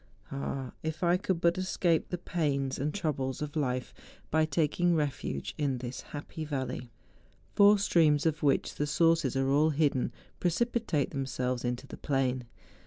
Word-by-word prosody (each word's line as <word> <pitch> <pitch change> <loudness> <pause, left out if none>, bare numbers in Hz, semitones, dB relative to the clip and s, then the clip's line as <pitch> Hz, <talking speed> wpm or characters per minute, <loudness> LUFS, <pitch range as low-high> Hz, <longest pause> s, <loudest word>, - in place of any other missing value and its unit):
Ah! 135 -1 -4
if 160 +2 -4
I 175 0 +4
could 185 -2 -1
but 170 +1 +3
escape 175 -3 +1
the 180 - -2
pains 140 -6 -1
and 145 +3 0
troubles 140 -9 -2
of 150 0 -5
life 130 -4 -1 0.4
by 160 0 +4
taking 165 +3 +1
refuge 140 - -2
in 140 -3 +1
this 125 0 -6
happy 150 +2 -7
valley. 130 -4 -4 0.6
Four 205 +1 +7
streams 160 -7 +3
of 155 -1 +1
which 140 -2 +2
the 145 - -2
sources 165 +1 +3
are 135 0 +1
all 150 +3 +4
hidden, 145 -4 +1 0.3
preci¬ 175 +7 +2
pitate 225 - -1
themselves 130 -2 -2
into 125 +2 -2
the - - -9
plain. 130 -3 0
150 Hz, 160 wpm, -30 LUFS, 135-165 Hz, 0.6 s, Four